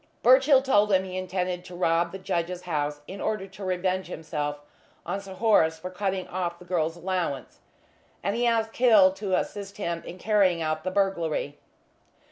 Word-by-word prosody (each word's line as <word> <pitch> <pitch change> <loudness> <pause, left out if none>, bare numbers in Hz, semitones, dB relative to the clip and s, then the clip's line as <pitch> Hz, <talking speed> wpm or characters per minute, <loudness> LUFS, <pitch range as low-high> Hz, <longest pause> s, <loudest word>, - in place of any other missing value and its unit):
Birchill 265 +2 +6
told 210 -6 +3
him 190 -1 +4
he 185 -1 -7
intended 185 -1 -2
to 180 - -10
rob 170 -1 +1
the 195 - -6
judge's 180 -1 -3
house 150 -4 -2
in 195 +4 -8
order 215 -3 -1
to 195 +1 -11
revenge 185 0 -1
himself 150 -3 -4 0.5
on 200 - -3
Sir 195 -1 -10
Horace 180 -6 +3
for 180 +3 -7
cutting 190 0 -2
off 175 -2 -3
the 180 - -14
girl's 165 -2 -1
allowance, 170 -7 -3 0.6
and 200 +3 0
he 240 +1 +1
asked 225 -1 +1
Hill 215 -7 +6
to 195 -1 -1
assist 200 -1 -5
him 170 -4 -3
in 175 - -9
carrying 195 -3 +2
out 155 -1 -2
the 185 - -1
burglary. 170 -7 -1
185 Hz, 175 wpm, -26 LUFS, 170-200 Hz, 0.6 s, Birchill